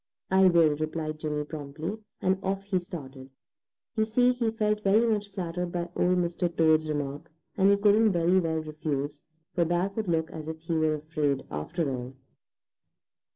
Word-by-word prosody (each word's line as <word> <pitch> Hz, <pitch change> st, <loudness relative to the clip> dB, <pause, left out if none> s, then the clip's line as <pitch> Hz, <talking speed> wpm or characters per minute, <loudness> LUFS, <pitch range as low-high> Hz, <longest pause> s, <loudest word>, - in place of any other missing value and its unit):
"I 190 Hz, 0 st, +6 dB
will," 165 Hz, -4 st, +4 dB
replied 155 Hz, 0 st, -3 dB
Jimmy 150 Hz, -1 st, -2 dB
promptly, 155 Hz, +6 st, -6 dB, 0.2 s
and 190 Hz, +1 st, +2 dB
off 195 Hz, 0 st, -2 dB
he 195 Hz, -2 st, 0 dB
started. 135 Hz, -7 st, -9 dB, 0.7 s
You 220 Hz, -, +3 dB
see, 245 Hz, +3 st, +3 dB
he 240 Hz, -2 st, 0 dB
felt 210 Hz, -1 st, 0 dB
very 210 Hz, +3 st, +4 dB
much 210 Hz, -3 st, 0 dB
flattered 180 Hz, -2 st, -3 dB
by 175 Hz, 0 st, -3 dB
Old 180 Hz, +1 st, +2 dB
Mr. 175 Hz, 0 st, 0 dB
Toad's 160 Hz, -1 st, +4 dB
remark, 145 Hz, -1 st, -3 dB, 0.3 s
and 195 Hz, 0 st, +4 dB
he 200 Hz, -, +5 dB
couldn't 210 Hz, +2 st, +4 dB
very 175 Hz, +1 st, +3 dB
well 165 Hz, -2 st, 0 dB
refuse, 150 Hz, -2 st, -4 dB, 0.3 s
for 175 Hz, -, +2 dB
that 175 Hz, +4 st, 0 dB
would 220 Hz, -3 st, -2 dB
look 160 Hz, -2 st, 0 dB
as 155 Hz, -1 st, -7 dB
if 160 Hz, 0 st, -4 dB
he 165 Hz, +1 st, -3 dB
were 155 Hz, -1 st, +2 dB
afraid, 150 Hz, -2 st, -1 dB
after 145 Hz, -, -2 dB
all. 125 Hz, +1 st, -6 dB
170 Hz, 170 wpm, -28 LUFS, 155-195 Hz, 0.7 s, I